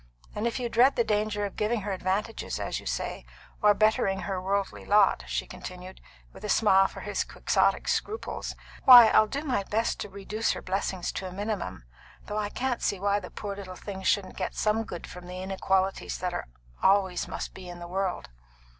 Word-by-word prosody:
And 215 +3 -1
if 235 - -2
you 245 - -1
dread 245 +4 +4
the 235 - +3
danger 210 -1 0
of 200 - -6
giving 215 +1 0
her 205 +1 -3
advantages, 195 +4 -2
as - - -2
you - - -10
say, - - -3 0.4
or 210 -1 +6
bettering 195 -3 +2
her 185 +1 -3
worldly 195 +1 -2
lot," 200 - +4
she - - -2
continued, 185 +1 -9 0.3
with - - -13
a 210 - -4
smile 195 -2 +5
for - - -10
his - - -1
quixotic - - +1
scruples, 435 +2 -2 0.3
"why, 245 -3 +11
I'll 215 - +5
do 280 +7 -3
my 255 -8 0
best 220 +4 -1
to 205 - -5
reduce 200 +3 -2
her - - -6
blessings 190 -1 -2
to 190 - -5
a - - -7
minimum; 195 - -4 0.4
though 210 - -4
I 205 -1 -1
don't 250 +1 -2
see 200 - 0
why 200 +1 +1
the 180 - -9
poor 200 -1 -5
little 190 -2 -8
thing 190 0 -7
shouldn't 190 0 0
get 185 - -3
some 220 +1 +1
good 175 -4 -7
from 180 0 -10
the 180 0 -6
inequalities 190 0 0
that 180 -1 -2
there - - -4 0.3
always 190 -2 +3
must - - -5
be 185 -1 -10
in 175 - -8
the 175 0 -8
world." 185 - -2
200 Hz, 200 wpm, -28 LUFS, 185-215 Hz, 0.4 s, why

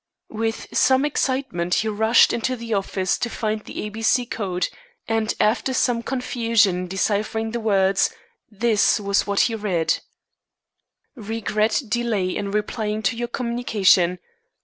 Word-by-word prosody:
With 225 +1 -2
some 260 +2 +4
excitement 260 -12 -1
he 220 - 0
rushed 220 +2 +4
into 235 +2 -1
the 230 -2 -5
office 190 -2 -1
to 240 - -1
find 215 -2 -3
the - - -6
A 210 - -4
B 220 +2 -8
C 245 +2 +2
Code, 190 -6 -2 0.4
and 225 -1 0
after 235 +5 +1
some 240 -2 +1
confusion 230 -5 +1
in 180 0 -4
deciphering 215 +4 -1
the 235 - -3
words, 195 -3 +2 0.4
this 215 -1 +2
was 200 0 0
what 200 0 +2
he 230 - +2
read: 195 -7 0 1.1
"Regret 220 +1 -1
delay 210 -4 -1
in 200 - -3
replying 210 +1 -2
to 195 - +1
your 240 +1 -3
communication. 220 -7 +2
220 Hz, 145 wpm, -22 LUFS, 200-235 Hz, 1.1 s, some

